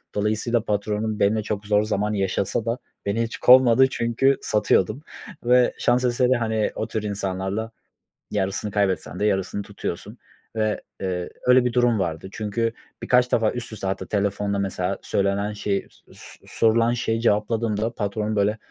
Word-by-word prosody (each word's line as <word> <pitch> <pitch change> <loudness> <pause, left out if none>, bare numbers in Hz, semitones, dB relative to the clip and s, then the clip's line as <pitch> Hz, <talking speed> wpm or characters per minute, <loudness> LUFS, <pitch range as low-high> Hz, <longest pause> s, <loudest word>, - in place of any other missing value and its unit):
Dolayısıyla 110 +2 0
patronum 105 +1 -1
benimle 105 +2 +2
çok 105 -1 -4
zor 105 0 +3
zaman 105 0 -1
yaşasa 100 +2 -1
da 115 +2 -1 0.3
beni 110 +3 0
hiç 115 - -5
kovmadı 130 0 +6
çünkü 125 +3 +1
satıyordum 105 +3 +1 0.4
ve 125 0 +4
şans 125 +1 +2
eseri, 125 +1 +2
hani 110 -2 0
o 110 - -3
tür 110 -1 -3
insanlarla 100 +2 -3 0.6
yarısını 100 +2 -2
kaybetsen 95 -3 -1
de 105 - +1
yarısını 95 0 0
tutuyorsun - - -6 0.4
ve, 110 -1 0 0.2
ııı, 90 -2 -2 0.2
öyle 125 0 +5
bir 120 - 0
durum 120 -3 +3
vardı. 85 +1 -3
Çünkü 115 +2 -2 0.3
birkaç 125 0 +3
defa 110 -2 +2
üst 125 -2 -6
üste 100 -3 -5
hatta 95 -1 -2
telefonda 100 0 -1
mesela 95 -1 -2
söylenen 100 +1 0
şey 100 -1 -2
so - - -22
so - - -15
sorulan 115 +1 +2
şeyi 115 -2 -1
cevapladığımda 110 +1 0
patron 105 +1 -2
böyle 105 +2 +1
105 Hz, 155 wpm, -23 LUFS, 100-115 Hz, 0.6 s, kovmadı